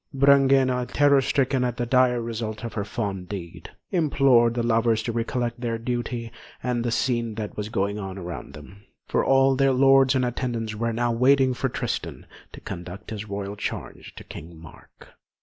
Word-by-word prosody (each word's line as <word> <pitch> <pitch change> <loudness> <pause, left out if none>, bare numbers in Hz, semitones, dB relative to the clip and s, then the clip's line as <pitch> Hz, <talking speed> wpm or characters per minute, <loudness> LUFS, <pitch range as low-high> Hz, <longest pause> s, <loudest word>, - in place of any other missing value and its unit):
Brangæna, 135 -2 +4
terror 140 -1 +4
stricken 135 -1 +1
at 125 -1 -2
the 120 - -1
dire 125 0 +3
result 115 -2 -5
of 115 - -5
her 100 - -2
fond 100 -4 -4
deed, 90 -5 -7 0.2
implored 135 -8 +3
the 120 - 0
lovers 115 -1 +2
to 115 - -2
recollect 120 +1 -2
their 115 -2 -1
duty 120 0 -4 0.3
and 125 -2 -1
the 120 - -1
scene 120 -2 -1
that 105 -2 -5
was 105 0 -4
going 100 -2 -1
on 95 -1 -6
around 85 -8 -7
them, 100 +2 -13 0.2
for - - +1
all 135 0 +4
their 135 0 +3
lords 135 0 +5
and 130 -1 +2
attendants 120 -3 -3
were 115 +2 -2
now 120 +1 0
waiting 130 +2 +3
for 130 +2 -2
Tristan - - -4 0.3
to - - -11
conduct 95 +1 -8
his 105 -1 -6
royal 100 0 -4
charge - - -6
to - - -10
King 80 +2 -10
Mark. 80 -2 -16
120 Hz, 180 wpm, -24 LUFS, 105-130 Hz, 0.3 s, lords